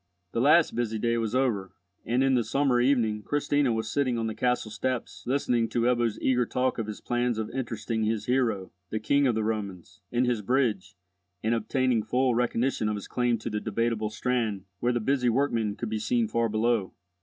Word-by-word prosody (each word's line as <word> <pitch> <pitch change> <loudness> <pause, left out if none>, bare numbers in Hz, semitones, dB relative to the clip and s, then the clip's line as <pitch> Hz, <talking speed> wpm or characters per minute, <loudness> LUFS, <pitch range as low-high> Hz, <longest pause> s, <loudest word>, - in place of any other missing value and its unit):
The 115 - 0
last 155 +5 +5
busy 115 -2 -1
day 115 +1 0
was 115 +1 -2
over, 105 -8 0 0.3
and 125 +3 +1
in 135 0 +3
the 125 -2 +3
summer 125 +2 +2
evening 120 -5 +2
Christina 145 +2 +1
was 110 -1 -1
sitting 130 -4 +1
on 115 - -1
the 110 - -2
castle 125 -3 0
steps 125 +3 -3
listening 120 -3 +1
to 120 - 0
Ebbo's 120 -2 +1
eager 125 -1 +2
talk 125 -1 0
of 110 - -2
his 105 - -6
plans 120 -1 -1
of 110 -1 -3
interesting 115 -3 -3
his 110 0 -1
hero, 115 -7 0 0.2
the 110 - -2
King 140 +6 +2
of 120 - +1
the 110 - 0
Romans, 100 -4 -4
in 120 +1 +1
his 120 -3 0
bridge, 115 -4 0 0.5
and 110 +2 +2
obtaining 120 +1 +1
full 125 +3 +1
recognition 120 -1 0
of 105 - -1
his 100 - -7
claim 120 -1 +1
to 110 - -5
the 105 - -1
Debateable 110 0 -1
Strand, 110 -4 -1
where 120 +3 +1
the 120 - 0
busy 125 +1 +1
workmen 115 -5 0
could 115 - -4
be 110 0 -2
seen 115 +1 +1
far 115 +1 0
below. 110 -2 0
115 Hz, 200 wpm, -27 LUFS, 110-125 Hz, 0.5 s, last